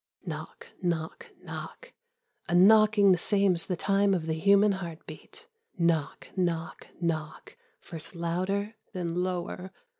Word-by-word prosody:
Knock, - - -7
knock, 170 -3 -3 0.2
knock. - - -9 0.6
A 175 - +1
knocking 210 +1 +6
the 180 - +3
same 200 0 +3
as 170 - -1
the 180 - -1
time 195 +2 +2
of 165 -3 -3
the 160 - -1
human 200 +5 +4
heartbeat. 170 -4 -8 0.3
Knock, 165 -4 0
knock, 170 -3 -2
knock, 160 -2 -3 0.3
first 165 +2 -8
louder, 185 +5 -2 0.2
then 175 -3 -3
lower. 180 +1 -4
180 Hz, 125 wpm, -28 LUFS, 170-200 Hz, 0.6 s, knocking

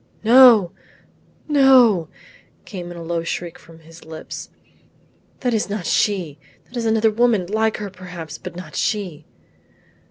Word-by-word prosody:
"No, 230 -6 +7 0.8
no," 255 - +4 0.6
came 180 -3 -8
in 175 - -9
a 170 - -8
low 165 0 -3
shriek 170 0 -5
from 165 0 -17
his 165 +2 -16
lips, 160 0 -9 0.9
"that 245 -2 0
is 215 -2 -1
not 200 -3 -4
she; 175 -9 -1 0.3
that 250 - -17
is 235 -1 -3
another 220 0 +2
woman, 225 -4 +1
like 220 +3 -1
her 205 -2 -6
perhaps, 180 -4 -9
but - - -9
not 175 -3 -10
she." 180 -8 -3
195 Hz, 140 wpm, -20 LUFS, 170-225 Hz, 0.9 s, No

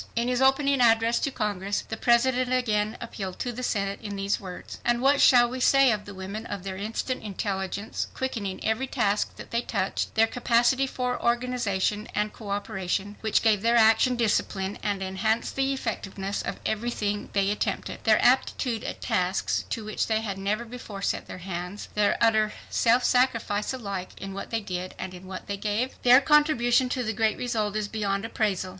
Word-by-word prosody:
In 235 +1 0
his 250 0 0
opening 270 0 +3
address 230 0 +4
to - - 0
Congress, 205 -5 -2
the 220 - -4
President 245 +2 +2
again 215 -4 +1
appealed 195 -5 -6
to 245 - -3
the 245 +1 -6
Senate 200 -5 -1
in 205 -2 -5
these 195 +1 -1
words: 185 -3 -9
"And 240 0 +2
what 275 +2 +3
shall 240 -2 +7
we 255 +2 -5
say 275 0 +5
of 210 -1 -2
the 200 - -9
women—of 200 +1 -6
their 195 -1 -5
instant 220 +6 -3
intelligence, 200 0 -3
quickening 220 -8 -3
every 220 +4 0
task 205 -3 0
that - - -11
they 235 0 +1
touched; 190 -5 -2
their 220 +1 +5
capacity 245 +3 +2
for 250 -1 -3
organization 235 -4 0
and 210 0 0
coöperation, 200 -1 -3
which 220 -1 +1
gave 215 -3 +3
their 230 +2 +3
action 225 +2 +5
discipline 205 -4 0
and 200 -2 -1
enhanced 215 +4 -1
the 270 0 +1
effectiveness 200 -6 -3
of - - -5
everything 210 -2 -2
they 200 0 +2
attempted; 210 - -3
their - - +5
aptitude 235 -4 +2
at - - -6
tasks 185 +1 0
to 225 - -3
which 215 - -2
they 220 -1 +1
had 200 -3 -4
never 210 +4 -1
before 225 -4 -8
set - - -1
their - - -7
hands; 180 +2 -5
their 210 -1 +2
utter 220 -2 +3 0.2
self 240 +2 +3
sacrifice 230 -5 +1
alike 200 -8 -5
in 195 0 -6
what 195 - -6
they 230 -1 -1
did 185 -2 -5
and 185 - -6
in 185 +1 -11
what 185 0 -7
they 200 - -4
gave? 215 +6 -1
Their 250 +2 +7
contribution 265 -4 +3
to 250 0 -1
the 220 -1 -2
great 220 0 +1
result 215 -4 -1
is 215 -1 -1
beyond 205 -1 -2
appraisal. 205 -5 -1
220 Hz, 185 wpm, -26 LUFS, 200-240 Hz, 0.2 s, shall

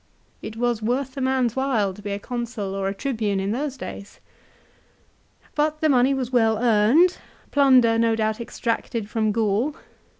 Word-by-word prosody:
It 220 - -7
was 240 -1 0
worth 255 +4 -2
a 275 - -4
man's 260 -3 +1
while 245 -8 0
to 210 - -13
be 205 - -6
a 200 - -2
Consul 230 -3 -5
or 195 0 -2
a 195 - -1
Tribune 215 -5 -1
in 195 +1 -2
those 270 +3 -3
days. 200 -5 -9 1.3
But 305 +1 0
the 310 - +2
money 265 0 +3
was 255 -2 -3
well 225 -3 +3
earned, 240 - +3 0.3
plunder 255 -5 +4
no 230 -1 +2
doubt 220 +1 -1
extracted 230 -1 -3
from 215 0 0
Gaul. 225 +6 0
235 Hz, 165 wpm, -23 LUFS, 215-265 Hz, 1.3 s, plunder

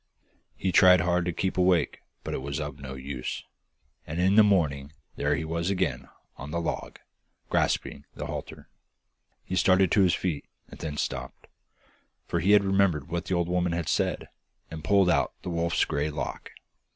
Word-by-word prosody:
He 95 - -1
tried 90 -1 +7
hard 90 0 +1
to 90 - 0
keep 95 +2 -2
awake, 90 -1 +2 0.2
but - - -4
it - - -3
was 70 +1 -4
of 75 -1 -5
no 65 -1 -7
use, 65 -1 -5 0.6
and 80 +2 -4
in 95 +2 +3
the 110 - +8
morning 75 -9 +2 0.2
there 70 0 +1
he 80 - -3
was 85 +2 -2
again 100 -2 -1 0.3
on 70 - -8
the 85 +2 -2
log, 85 - -4 0.5
grasping 70 - 0
the - - -5
halter. - - -7 0.8
He 95 - -4
started 95 -1 +4
to 105 - +4
his 90 -3 +4
feet, 85 -6 -3 0.2
and - - -13
then 75 -2 -5
stopped, 65 -2 -4 0.8
for - - -1
he 100 +5 +6
remembered 95 -6 +1
what 85 0 -3
the 95 - -1
old 85 -1 0
woman 90 -1 0
had 85 -2 -2
said, - - 0 0.4
and 80 -1 -7
pulled 100 0 +4
out - - +1
the 90 - -4
wolf's 85 0 +1
grey 75 +2 -1
lock. 75 - -5
85 Hz, 175 wpm, -27 LUFS, 75-95 Hz, 0.8 s, the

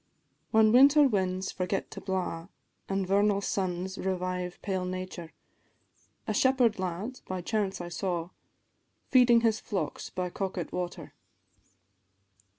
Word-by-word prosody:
"_ - - -45 0.5
Whan 220 -1 +5
winter 280 +5 +7
winds 190 -4 -1
forget 190 +1 -2
to 195 - -8
blaw, 185 -3 -3 0.4
An' 195 0 0
vernal 200 +1 +3
suns 190 -1 -2
revive 180 -1 -2
pale 190 -2 -1
nature, 185 -2 -5 0.9
A - - -1
shepherd 255 -5 +3
lad 190 +8 -4
by 185 -1 -3
chance 205 -1 -1
I 175 0 -5
saw, 175 -1 -3 0.8
Feeding 245 -2 +6
his 220 -2 +2
flocks 195 - -4
by 180 -1 -3
Coquet 190 -3 -4
water. 180 -1 -5
190 Hz, 125 wpm, -29 LUFS, 180-210 Hz, 0.9 s, winter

